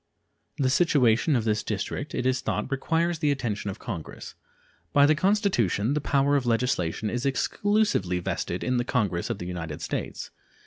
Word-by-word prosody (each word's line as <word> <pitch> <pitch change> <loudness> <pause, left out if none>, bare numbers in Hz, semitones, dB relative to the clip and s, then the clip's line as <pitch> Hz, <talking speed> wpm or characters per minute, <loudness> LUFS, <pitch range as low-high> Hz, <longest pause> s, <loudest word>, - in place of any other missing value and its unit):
The 130 -3 +1
situation 140 -3 +3
of 120 - +1
this 105 -1 +1
District, 110 +7 -4
it 125 - -2
is 130 0 +1
thought, 135 - -2
requires 165 +4 0
the 150 -2 +1
attention 115 -8 -2
of 95 - -5
Congress. 95 -10 -7 0.6
By 140 0 +6
the 150 - +5
Constitution 155 - +1
the 150 - 0
power 140 0 +2
of 135 -3 0
legislation 115 -5 0
is 120 0 -2
exclusively 170 - +1
vested 90 0 -3
in 125 -1 0
the 120 - +1
Congress 105 -9 -1
of - - -2
the 90 - -6
United 85 -3 -5
States. 80 - -4
125 Hz, 170 wpm, -26 LUFS, 100-145 Hz, 0.6 s, By